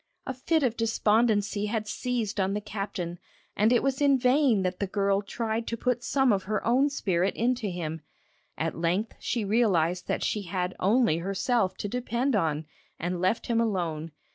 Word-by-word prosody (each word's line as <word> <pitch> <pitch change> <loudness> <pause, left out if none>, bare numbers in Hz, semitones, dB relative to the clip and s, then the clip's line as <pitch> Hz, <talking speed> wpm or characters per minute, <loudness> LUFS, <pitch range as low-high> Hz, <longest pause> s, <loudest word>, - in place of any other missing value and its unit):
A 265 - -3
fit 300 +5 0
of 240 -3 +1
despondency 215 -2 +2
had 215 0 -2
seized 230 -2 -2
on 195 +1 +1
the - - 0
captain, 195 -4 -5 0.4
and 215 +3 +3
it 245 - +3
was 270 0 0
in 280 -2 +5
vain 250 -4 +3
that 185 0 -2
the 200 - -1
girl 200 0 +1
tried 225 +2 -3
to 230 - -2
put 250 0 -1
some 265 -1 +2
of 190 -1 -1
her 210 +1 -2
own 260 +5 +3
spirit 190 -9 0
into 240 -1 0
him. 165 -3 -4 0.6
At 165 0 -1
length 175 +7 0
she 230 -4 -2
realised 185 -5 +2
that - - -1
she 210 - 0
had 180 -1 -3
only 215 -4 +3
herself 195 +3 0
to - - -3
depend 245 +3 -1
on, 160 -5 0 0.3
and 175 +1 -3
left 185 +5 +1
him 230 -1 +1
alone. 170 -7 -2
210 Hz, 180 wpm, -27 LUFS, 185-240 Hz, 0.6 s, in